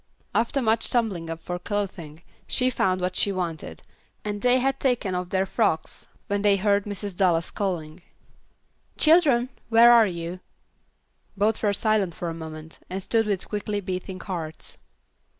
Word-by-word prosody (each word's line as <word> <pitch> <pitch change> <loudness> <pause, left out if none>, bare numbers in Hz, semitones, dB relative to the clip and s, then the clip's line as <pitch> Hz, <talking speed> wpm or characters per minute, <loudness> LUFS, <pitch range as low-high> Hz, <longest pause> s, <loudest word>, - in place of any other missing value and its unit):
After 245 +4 +1
much 225 0 +2
tumbling 200 -9 -1
up 165 0 -7
of 180 0 -4
clothing, 180 -7 -4 0.2
she 255 0 +1
found 185 -5 +1
what 180 0 -1
she 200 - +2
wanted, 165 - -4 0.4
and 205 -1 -3
they 250 0 +4
had 270 +1 0
taken 245 -7 0
off 180 0 -3
their 190 0 +1
frocks 195 -6 -1 0.2
when 200 0 -1
they 205 -1 +4
heard 200 0 +2
Mrs. 205 -2 -6
Dallas 175 -3 +2
calling, 175 -4 -3 1.0
"Children, 300 -7 +4 0.2
where 230 +1 +7
are 230 -2 +7
you?" 170 0 -5 1.0
Both 210 +2 +1
were 210 - +2
silent 200 -4 +1
for 175 - -4
a - - -4
moment, 160 -1 -9
and 190 +1 -4
stood 225 +1 +1
with 200 -3 -2
quickly 210 0 -2
beating 185 -1 -5
hearts. 165 -6 -7
195 Hz, 155 wpm, -25 LUFS, 175-220 Hz, 1.0 s, where